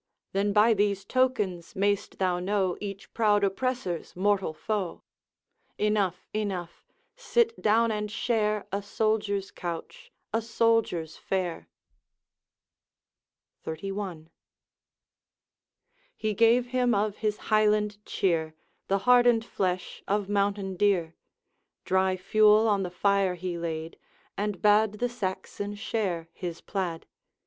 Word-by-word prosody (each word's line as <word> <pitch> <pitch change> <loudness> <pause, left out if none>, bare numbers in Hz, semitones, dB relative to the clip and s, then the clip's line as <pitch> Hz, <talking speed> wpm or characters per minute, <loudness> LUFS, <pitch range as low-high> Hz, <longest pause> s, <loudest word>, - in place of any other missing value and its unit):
'Then 200 +1 +1
by 215 +3 +5
these 200 -2 0
tokens 210 -9 0
mayst 200 +1 0
thou 180 -2 +1
know 190 -1 0
Each 200 -1 -7
proud 210 -3 +3
oppressor's 200 -3 -2
mortal 195 -1 +1
foe.' 190 +2 -3 0.7
'Enough, 210 -4 0
enough; 190 -5 -3 0.3
sit 470 -2 +1
down 225 +2 +3
and 210 -1 -2
share 215 -1 0
A 200 +1 -1
soldier's 205 -1 -1
couch, 180 - -7 0.2
a 225 - +2
soldier's 225 -8 +1
fare.' 185 -3 -3 1.9
XXXI.. 175 -1 -5 1.9
He 215 -1 -1
gave 230 +3 +4
him 250 -2 +2
of 205 0 0
his 215 -1 -1 0.2
Highland 210 -1 +2
cheer, 160 -6 0 0.3
The 195 - +2
hardened 245 -2 +5
flesh 185 -4 -2
of 205 0 0
mountain 200 -2 0
deer; 180 -5 +2 0.7
Dry 190 0 +2
fuel 215 +3 +5
on 205 -2 +2
the 180 - -2
fire 195 0 +1
he 180 0 -4
laid, 165 -1 -5 0.4
And 205 -2 -3
bade 210 0 +5
the 245 +4 -1
Saxon 205 -1 -4
share 195 -6 -2
his 170 -2 -5
plaid. 180 -5 -3
205 Hz, 115 wpm, -28 LUFS, 185-215 Hz, 1.9 s, by